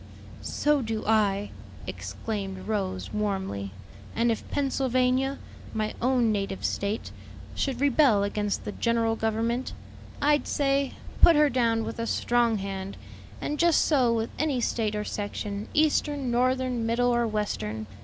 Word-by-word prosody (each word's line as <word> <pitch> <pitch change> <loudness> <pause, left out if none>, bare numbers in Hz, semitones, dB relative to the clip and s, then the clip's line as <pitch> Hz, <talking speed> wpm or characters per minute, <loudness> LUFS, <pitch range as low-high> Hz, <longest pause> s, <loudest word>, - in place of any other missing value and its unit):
"So 295 -1 +1
do 225 -2 -3
I!" 205 -2 +2 0.3
exclaimed 195 -4 -5
Rose 190 -4 -2
warmly; 190 - -2 0.5
"and 235 +1 +2
if 225 - -4
Pennsylvania, 265 -1 +1 0.4
my 215 -1 -1
own 245 -2 +3
native 195 -2 -2
State, 200 +2 -2 0.4
should 265 -3 -1
rebel 275 -6 +4
against 205 0 -2
the - - -3
general 230 0 +1
government, 225 +3 -1 0.5
I'd 295 +1 +2
say, 275 -1 +1 0.3
'Put 335 - +8
her 295 -1 +4
down 230 -3 +2
with - - -5
a 230 - -2
strong 235 -2 +2
hand'; 195 0 -5 0.4
and 295 - -3
just 340 -2 +4
so 260 -6 +3
with 225 -1 -1
any 290 -4 +1
State 220 -3 0
or 210 - -1
section, 205 0 -4
Eastern, 295 -3 +1
Northern, 255 0 +1
Middle 240 +2 +2
or 240 -1 +2
Western. 110 - -2
230 Hz, 135 wpm, -27 LUFS, 210-260 Hz, 0.5 s, Put